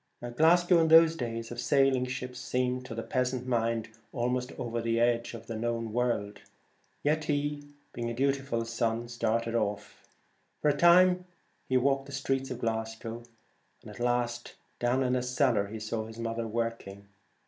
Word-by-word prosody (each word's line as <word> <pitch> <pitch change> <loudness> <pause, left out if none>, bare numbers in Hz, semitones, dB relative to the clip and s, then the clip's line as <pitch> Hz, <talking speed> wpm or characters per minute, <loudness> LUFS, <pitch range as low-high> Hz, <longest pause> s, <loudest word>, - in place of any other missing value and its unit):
Glasgow 175 +4 +5
in 160 - +3
those 165 0 +7
days 115 -4 -4
of 120 - -6
sailing 130 0 +3
ships 125 0 -5
seemed 125 0 -1
to 115 - -6
the 115 - -4
peasant 125 0 -1
mind 115 -2 0 0.2
almost 125 +1 -1
over 120 -1 -3
the 115 0 0
edge 120 0 +1
of 115 0 -10
the 115 - -5
known 115 0 -2
world, 115 -4 -1 0.6
yet 150 +1 +1
he, 145 -1 -2 0.3
being 120 -1 -3
a - - -3
dutiful 135 -3 0
son, 115 0 -1
started 115 -1 -1
away. 105 -3 0 0.8
For 150 - +2
a - - +5
long 145 - -4
time 180 +1 +6 0.4
he 130 - +3
walked 135 +1 +1
the 140 - -10
streets 135 0 -1
of 125 - -4
Glas 115 -1 -2
gow; 115 +1 -7 0.6
at - - -10
last 120 0 -1 0.2
down 125 +2 +1
in 125 0 +1
a 125 - +1
cellar 125 -4 +1
he 110 +2 -7
saw 110 +1 -3
his 110 0 -11
121 115 - -5
The 115 - -1
mother 115 0 -3
working. 110 -3 -4
120 Hz, 180 wpm, -29 LUFS, 115-135 Hz, 0.8 s, those